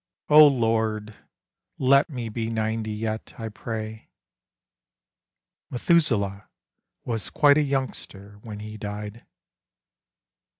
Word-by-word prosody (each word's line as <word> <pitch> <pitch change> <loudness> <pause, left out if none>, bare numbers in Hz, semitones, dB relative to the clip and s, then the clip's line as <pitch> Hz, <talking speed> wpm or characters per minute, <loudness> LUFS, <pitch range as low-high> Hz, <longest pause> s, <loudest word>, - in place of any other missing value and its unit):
O 150 0 +9
Lord, 110 -4 0 0.6
let 140 +3 +4
me 125 -6 -5
be 115 +1 -3
ninety 110 0 -2
yet, 110 +1 -4
I 115 -1 -5
pray. 110 0 -6 1.6
Methuselah 115 - +1 0.6
was 115 -3 -3
quite 145 -1 +5
a - - +4
youngster 125 -8 -4
when 105 -2 -8
He 105 0 -8
died. 105 +2 -7
110 Hz, 95 wpm, -25 LUFS, 105-130 Hz, 1.6 s, O